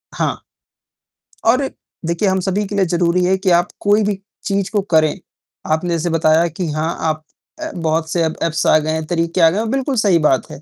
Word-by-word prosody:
हाँ। -, -, -1 dB, 1.1 s
और 255 Hz, +4 st, +3 dB, 0.4 s
देखिए 170 Hz, +5 st, 0 dB
हम 190 Hz, 0 st, +1 dB
सभी 195 Hz, +2 st, -1 dB
के 205 Hz, -, -5 dB
लिए 195 Hz, -2 st, +3 dB
ज़रूरी 175 Hz, +1 st, +1 dB
है 190 Hz, +1 st, +2 dB
कि 190 Hz, 0 st, 0 dB
आप 175 Hz, +1 st, +3 dB
कोई 210 Hz, +1 st, +3 dB
भी 200 Hz, -2 st, -1 dB, 0.3 s
चीज़ 200 Hz, -2 st, 0 dB
को 210 Hz, -, +1 dB
करें, 155 Hz, +3 st, +3 dB, 0.5 s
आपने 160 Hz, +3 st, 0 dB
जैसे 170 Hz, +1 st, -1 dB
बताया 165 Hz, +1 st, +3 dB
कि 170 Hz, +2 st, -4 dB
हाँ, 155 Hz, +2 st, -2 dB
आप 155 Hz, -1 st, -1 dB, 0.4 s
अ, -, -, -4 dB
बहुत 160 Hz, -1 st, -1 dB
से 170 Hz, -, +1 dB
एप्स 160 Hz, 0 st, -1 dB
आ -, -, +6 dB
गए 155 Hz, +1 st, -2 dB
हैं, 160 Hz, 0 st, -2 dB
तरीके 170 Hz, +1 st, 0 dB
आ 165 Hz, -, +7 dB
गए 185 Hz, -, -2 dB
हैं, 225 Hz, 0 st, -2 dB
बिल्कुल 270 Hz, +1 st, -1 dB
सही 195 Hz, -6 st, +3 dB
बात 135 Hz, -4 st, +1 dB
है। -, -, -10 dB
175 Hz, 210 wpm, -18 LUFS, 160-195 Hz, 1.1 s, आ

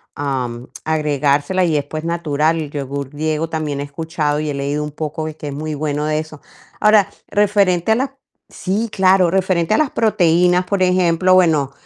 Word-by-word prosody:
am, 125 Hz, -4 st, -3 dB, 0.2 s
agregársela, 150 Hz, +3 st, +1 dB
y 165 Hz, -3 st, +1 dB
después 150 Hz, +2 st, -3 dB
natural. 165 Hz, -1 st, 0 dB
El 150 Hz, -2 st, -5 dB
yogur 140 Hz, -1 st, -4 dB
griego 155 Hz, +2 st, -2 dB
también 150 Hz, -3 st, -3 dB
he -, -, -2 dB
escuchado 150 Hz, 0 st, -2 dB
y 155 Hz, -, -3 dB
he -, -, -2 dB
leído 140 Hz, +2 st, -2 dB
un 150 Hz, -, -5 dB
poco 155 Hz, +1 st, -4 dB
de 155 Hz, 0 st, -8 dB
que 150 Hz, -, -7 dB
es 140 Hz, -, -4 dB
muy 155 Hz, +1 st, -4 dB
bueno 150 Hz, 0 st, -2 dB
de 155 Hz, 0 st, 0 dB
eso. 155 Hz, -1 st, -8 dB, 0.4 s
Ahora, 210 Hz, -2 st, +5 dB, 0.2 s
referente 200 Hz, -1 st, +2 dB
a -, -, +1 dB
las 265 Hz, +3 st, -1 dB, 0.4 s
sí, 210 Hz, +4 st, -2 dB
claro, 185 Hz, -2 st, +3 dB
referente 185 Hz, 0 st, +1 dB
a -, -, +2 dB
las 305 Hz, -4 st, +1 dB
proteínas, 180 Hz, -4 st, +2 dB
por 195 Hz, 0 st, -1 dB
ejemplo, 180 Hz, 0 st, +3 dB
bueno, 155 Hz, -7 st, +3 dB
155 Hz, 180 wpm, -18 LUFS, 145-185 Hz, 0.4 s, Ahora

